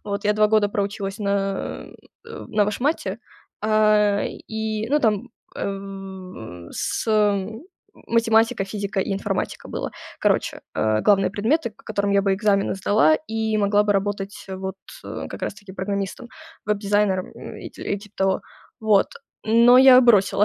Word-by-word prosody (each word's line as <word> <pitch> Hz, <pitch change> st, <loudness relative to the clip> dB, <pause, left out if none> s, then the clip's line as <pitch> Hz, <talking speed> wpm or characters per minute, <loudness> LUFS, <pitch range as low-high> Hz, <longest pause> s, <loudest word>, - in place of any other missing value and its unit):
Вот 200 Hz, 0 st, -4 dB
я 210 Hz, -, +4 dB
2 210 Hz, 0 st, +3 dB
года 215 Hz, -1 st, +3 dB
проучилась 200 Hz, 0 st, -3 dB
на, 200 Hz, -1 st, -2 dB, 0.4 s
э-э, -, -, -9 dB
на 210 Hz, -1 st, +2 dB
вышмате. 255 Hz, +10 st, -1 dB, 0.4 s
Э-э, 215 Hz, -1 st, +3 dB, 0.2 s
и, 220 Hz, 0 st, -3 dB
ну, 295 Hz, -, +4 dB
там, 225 Hz, -1 st, 0 dB, 0.3 s
э-э, 190 Hz, -, -7 dB
с -, -, -2 dB, 1.0 s
математика, 225 Hz, -1 st, +2 dB
физика 200 Hz, 0 st, -3 dB
и 195 Hz, -, -2 dB
информатика 195 Hz, -1 st, -3 dB
было. -, -, -4 dB, 0.3 s
Короче, -, -, +1 dB
э, 110 Hz, 0 st, +1 dB
главные 195 Hz, -2 st, +4 dB
предметы, 235 Hz, +6 st, 0 dB
к -, -, -22 dB
которым 200 Hz, -2 st, -1 dB
я 200 Hz, 0 st, +3 dB
бы 195 Hz, -, +2 dB
экзамены 200 Hz, -1 st, +1 dB
сдала 215 Hz, +11 st, +4 dB
и 220 Hz, -1 st, -1 dB
могла 205 Hz, 0 st, +3 dB
бы 210 Hz, 0 st, +2 dB
работать 200 Hz, 0 st, -3 dB
вот 190 Hz, 0 st, -5 dB, 0.3 s
как -, -, -7 dB
раз -, -, -2 dB
таки 205 Hz, -2 st, -13 dB
программистом, 200 Hz, +4 st, -4 dB, 0.4 s
веб-дизайнером 205 Hz, -2 st, 0 dB, 0.2 s
и -, -, -9 dB
и 200 Hz, -, -4 dB
типа 210 Hz, 0 st, -16 dB
того, 190 Hz, 0 st, +1 dB, 0.4 s
вот. 215 Hz, -4 st, +3 dB, 0.4 s
Но 235 Hz, +3 st, +6 dB
я 260 Hz, -1 st, +9 dB
бросила 205 Hz, -4 st, +4 dB
205 Hz, 140 wpm, -23 LUFS, 195-220 Hz, 1.0 s, я